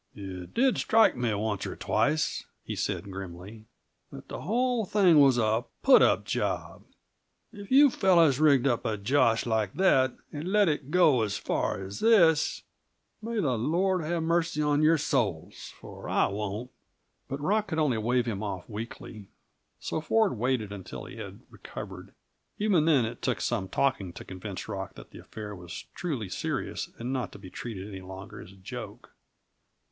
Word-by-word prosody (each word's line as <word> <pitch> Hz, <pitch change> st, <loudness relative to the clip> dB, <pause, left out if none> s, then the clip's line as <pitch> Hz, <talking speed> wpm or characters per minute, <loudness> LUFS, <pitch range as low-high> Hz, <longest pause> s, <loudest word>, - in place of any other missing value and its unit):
"It 95 Hz, -3 st, -8 dB
did 260 Hz, +1 st, +3 dB
strike 225 Hz, 0 st, +4 dB
me, 120 Hz, -2 st, 0 dB
once 105 Hz, -1 st, -2 dB
or -, -, -6 dB
twice," 155 Hz, +1 st, 0 dB, 0.2 s
he -, -, -5 dB
said 100 Hz, -, -3 dB
grimly, 95 Hz, +3 st, -9 dB, 0.5 s
"that -, -, -11 dB
the -, -, -6 dB
whole 245 Hz, +2 st, +1 dB
thing 185 Hz, -5 st, +4 dB
was 135 Hz, -3 st, +6 dB
a 110 Hz, +1 st, +1 dB, 0.2 s
put 270 Hz, -1 st, +7 dB
up -, -, +3 dB
job. -, -, -2 dB, 0.7 s
If 205 Hz, -1 st, -10 dB
you 275 Hz, +1 st, +7 dB
fellows 170 Hz, -, +4 dB
rigged 140 Hz, -4 st, +4 dB
up 120 Hz, -4 st, +1 dB
a 110 Hz, -1 st, -1 dB
josh 115 Hz, +1 st, +2 dB
like 110 Hz, -4 st, -1 dB
that, 130 Hz, -9 st, +3 dB, 0.2 s
and 155 Hz, +5 st, -4 dB
let 210 Hz, -1 st, +4 dB
it 145 Hz, -2 st, -2 dB
go 155 Hz, -7 st, +4 dB
as 105 Hz, -3 st, -1 dB
far -, -, -1 dB
as 95 Hz, +1 st, -7 dB
this, 175 Hz, -9 st, +4 dB, 0.6 s
may 230 Hz, +2 st, -4 dB
the 135 Hz, -, 0 dB
Lord 180 Hz, -, +1 dB
have 165 Hz, +1 st, -1 dB
mercy 165 Hz, -2 st, 0 dB
on 150 Hz, 0 st, +2 dB
your 160 Hz, +2 st, +5 dB
souls, 115 Hz, -, -2 dB
for -, -, -9 dB
I -, -, +3 dB
won't!" 105 Hz, +4 st, -4 dB, 0.6 s
But 135 Hz, -, -4 dB
Rock 205 Hz, +8 st, +1 dB
could 160 Hz, -4 st, -3 dB
only 145 Hz, -8 st, +2 dB
wave 120 Hz, +2 st, +1 dB
him 110 Hz, -4 st, -3 dB
off 95 Hz, -4 st, -5 dB
weakly; 110 Hz, -1 st, -8 dB, 0.5 s
so 160 Hz, -, -3 dB
Ford 215 Hz, -, +2 dB
waited 120 Hz, -2 st, -1 dB
until 100 Hz, -2 st, -8 dB
he -, -, -10 dB
had -, -, -8 dB
recovered. -, -, -9 dB, 0.4 s
Even 200 Hz, -7 st, +2 dB
then, 145 Hz, -7 st, +4 dB
it 115 Hz, +2 st, -6 dB
took 125 Hz, -7 st, -1 dB
some 100 Hz, 0 st, -1 dB
talking 100 Hz, -7 st, 0 dB
to -, -, -10 dB
convince 95 Hz, 0 st, -7 dB
Rock 95 Hz, -3 st, -5 dB
that -, -, -13 dB
the -, -, -11 dB
affair 105 Hz, -2 st, -8 dB
was 90 Hz, -1 st, -9 dB
truly 140 Hz, -, -3 dB
serious 90 Hz, -, -3 dB
and 120 Hz, +3 st, -4 dB
not 130 Hz, -2 st, -2 dB
to -, -, -9 dB
be 95 Hz, -2 st, -12 dB
treated 105 Hz, -5 st, -6 dB
any 95 Hz, -2 st, -8 dB
longer 95 Hz, +1 st, -9 dB
as 90 Hz, -, -12 dB
a -, -, -16 dB
joke. 95 Hz, -1 st, -9 dB
125 Hz, 175 wpm, -28 LUFS, 105-165 Hz, 0.7 s, put